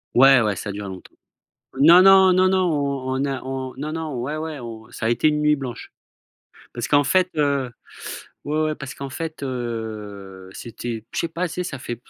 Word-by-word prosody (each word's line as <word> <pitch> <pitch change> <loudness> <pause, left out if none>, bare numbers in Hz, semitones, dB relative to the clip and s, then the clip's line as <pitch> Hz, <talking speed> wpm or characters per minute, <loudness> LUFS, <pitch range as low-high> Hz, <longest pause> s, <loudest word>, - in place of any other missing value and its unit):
Ouais, 135 0 +7
ouais, 105 -3 0
ça 105 - -5
a - - -2
duré 100 0 -6
longtemps. 95 -1 -10 0.6
Non, 170 +6 +8
non, 190 -1 +7
non, 185 +1 +4
non, 190 0 +2
on 140 -3 -1
on 135 +1 0
a 135 -2 -3
on 130 0 -5
non, 150 +2 -4
non, 155 -6 -4
ouais, 145 +5 -3
ouais, 155 -3 -5
on 115 -1 -9
ça 115 - -4
a - - +2
été 120 +6 +3
une 150 0 0
nuit 150 0 +3
blanche 130 -3 -7 0.8
parce 120 - -3
qu'en 145 0 +4
fait, 185 +4 +2
heu, 140 -3 +1 0.8
ouais, 150 +2 0
ouais, 155 0 -1
parce 140 -2 -7
qu'en 140 0 -6
fait, 160 +2 -6
heu, 110 -7 -6
c'était 115 -1 -6
je - - -3
sais - - 0
pas 175 +2 -2
c'est 180 +2 -3
ça 140 -6 -6
fait, 120 - -5
135 Hz, 210 wpm, -22 LUFS, 120-155 Hz, 0.8 s, Non